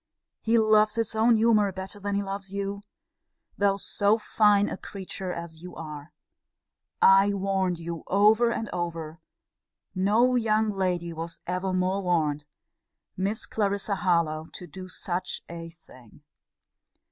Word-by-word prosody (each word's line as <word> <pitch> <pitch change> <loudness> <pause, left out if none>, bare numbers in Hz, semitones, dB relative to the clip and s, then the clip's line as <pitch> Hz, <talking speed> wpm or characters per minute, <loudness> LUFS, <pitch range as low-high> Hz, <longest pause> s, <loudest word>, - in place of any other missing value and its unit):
He 230 +1 +2
loves 215 -1 +4
his 230 -1 -1
own 225 +2 +4
humour 215 -2 +3
better 190 +2 -7
than 205 0 -2
he 200 - 0
loves 195 0 -6
you 200 0 -3 0.7
though 200 -1 +2
so 205 +2 +1
fine 210 -2 +3
a - - -3
creature 190 -1 -6
as 170 -2 -7
you 180 0 -10
are! 150 -1 -8 0.9
I 195 +1 +6
warned 190 -2 0
you 170 0 -6
over 215 +4 +4
and 225 -1 -2
over: 165 -2 -4 0.7
no 215 +7 +3
young 220 -2 +2
lady 180 -3 -1
was 165 +1 -7
ever 185 +1 -2
more 185 +2 0
warned! 155 -5 0 0.7
Miss 200 +4 -2
Clarissa 200 -1 -1
Harlowe 165 -4 +1
to 180 - -8
do 185 +3 -9
such 180 0 -4
a 165 0 -7
thing! 145 -6 -18
195 Hz, 135 wpm, -27 LUFS, 170-205 Hz, 0.9 s, I